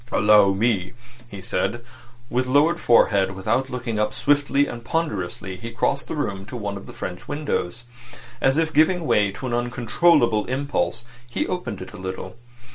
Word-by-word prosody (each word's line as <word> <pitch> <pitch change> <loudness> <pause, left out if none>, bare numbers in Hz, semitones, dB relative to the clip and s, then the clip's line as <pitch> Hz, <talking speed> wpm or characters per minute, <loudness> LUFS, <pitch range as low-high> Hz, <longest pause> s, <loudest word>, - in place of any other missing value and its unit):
"Allow 105 -2 +5
me," 100 -2 0 0.4
he 100 -3 -8
said. 120 +5 -2 0.5
With 125 +1 0
lowered 145 +6 +3
forehead, 100 -5 +3
without 115 +7 0
looking 120 -4 -3
up, 105 0 0
swiftly 145 -1 +2
and 120 -3 -7
ponderously 95 - -3
he 115 +4 -7
crossed 125 +4 -1
the - - -4
room 100 -10 -3
to 125 - -6
one 100 -3 -4
of 100 - -9
the - - -9
French 90 -1 -7
windows. 145 -8 -3 0.6
As 135 +2 +3
if 160 -1 +1
giving 165 +3 +3
way 105 -7 +3
to 130 - -7
an 125 - -2
uncontrollable 120 0 +2
impulse, 140 0 -2 0.3
he 120 - -1
opened 120 - -4
it - - -12
a - - -9
little. 95 +3 -6
120 Hz, 170 wpm, -23 LUFS, 100-140 Hz, 0.6 s, Allow